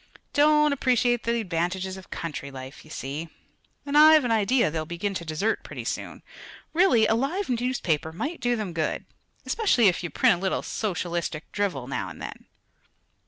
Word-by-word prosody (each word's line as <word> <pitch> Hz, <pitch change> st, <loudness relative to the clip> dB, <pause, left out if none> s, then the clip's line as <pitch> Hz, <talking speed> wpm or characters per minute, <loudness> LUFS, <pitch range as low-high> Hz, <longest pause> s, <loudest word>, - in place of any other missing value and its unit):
Don't 300 Hz, 0 st, +4 dB
appreciate 245 Hz, -3 st, +1 dB
the 235 Hz, 0 st, +1 dB
advantages 185 Hz, 0 st, -2 dB
of 190 Hz, -1 st, -12 dB
country 150 Hz, -4 st, -5 dB
life, 130 Hz, 0 st, -9 dB
you 155 Hz, -, -17 dB
see, 150 Hz, +3 st, -5 dB, 0.6 s
and 285 Hz, 0 st, -3 dB
I've 310 Hz, -1 st, +8 dB
an 240 Hz, -, 0 dB
idea 225 Hz, -2 st, +3 dB
they'll 160 Hz, 0 st, -2 dB
begin 170 Hz, +5 st, -3 dB
to 180 Hz, -, -4 dB
desert, 170 Hz, +8 st, -1 dB
pretty -, -, -7 dB
soon. -, -, -5 dB, 0.5 s
Really, 320 Hz, -, +5 dB
a 220 Hz, -, +3 dB
live 275 Hz, -, -1 dB
newspaper 230 Hz, -, 0 dB
might 290 Hz, -, -4 dB
do 245 Hz, -1 st, +1 dB
them 210 Hz, -6 st, -4 dB
good 160 Hz, -2 st, -2 dB, 0.4 s
especially 390 Hz, -, +3 dB
if 175 Hz, -, -2 dB
you 175 Hz, -, -3 dB
print 175 Hz, -, +3 dB
a -, -, -11 dB
little 190 Hz, -, -1 dB
socialistic 175 Hz, -6 st, -3 dB
drivel 190 Hz, -11 st, -1 dB
now 135 Hz, -, -3 dB
and -, -, -11 dB
then." -, -, -8 dB
205 Hz, 170 wpm, -26 LUFS, 165-250 Hz, 0.6 s, I've